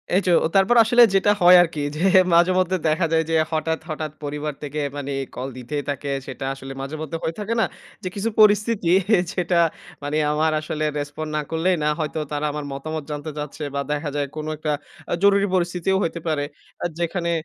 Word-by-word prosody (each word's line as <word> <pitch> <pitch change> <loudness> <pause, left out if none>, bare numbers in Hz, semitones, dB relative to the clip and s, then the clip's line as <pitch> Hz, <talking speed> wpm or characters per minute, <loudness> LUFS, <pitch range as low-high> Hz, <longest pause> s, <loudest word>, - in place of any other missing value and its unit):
এই 195 - +4
যে, 180 - +3
ও - - +3
তারপর 195 +5 +4
আসলে 240 +2 +6
যেটা 205 +2 +4
হয় 180 +1 +9
আরকি 160 -3 -4
যে, 160 - -4 0.3
মাঝেমধ্যে 185 +2 +3
দেখা 160 +3 +2
যায় 160 0 +3
যে, 165 - +1 0.2
হঠাৎ, 160 0 -1
হঠাৎ 155 -1 -4
পরিবার 150 +1 -3
থেকে 145 +1 -4 0.2
মানে 140 -1 -4 0.2
কল 130 +2 -4
দিতেই 145 +4 -4
থাকে। 140 0 -3 0.2
সেটা 135 0 -6
আসলে 135 0 -8
মাঝে-মধ্যে 155 +3 -5
হয়ে 160 - -2
থাকে 210 +2 -2
না? - - +4 0.4
যে, - - -3
কিছু 210 +3 -1
পরিস্থিতি 210 -3 +3 0.4
যেটা, 175 -2 +1 0.4
মানে 145 +2 -1 0.2
আমার 155 +1 +2
আসলে 155 0 -3
রেসপন্ড 145 +2 -5
না - - 0
করলেই 175 +3 +2
না। 150 - +2
হয়তো 155 0 -2
তারা 145 +1 -1
আমার 150 0 -5
মতামত 155 +3 -5
জানতে 150 +1 -5
চাচ্ছে 150 +1 -5
বা 140 - 0
দেখা 150 0 -2
যায় 145 -1 0
কোনো 155 0 -4
একটা 155 0 -2 0.4
আ - - +2
জরুরি 200 0 +5
পরিস্থিতিও 180 +1 0
হইতে 170 0 -2
পারে, 150 -2 0 0.4
আ - - 0
যেখানে 170 0 -1
155 Hz, 195 wpm, -22 LUFS, 150-180 Hz, 0.4 s, হয়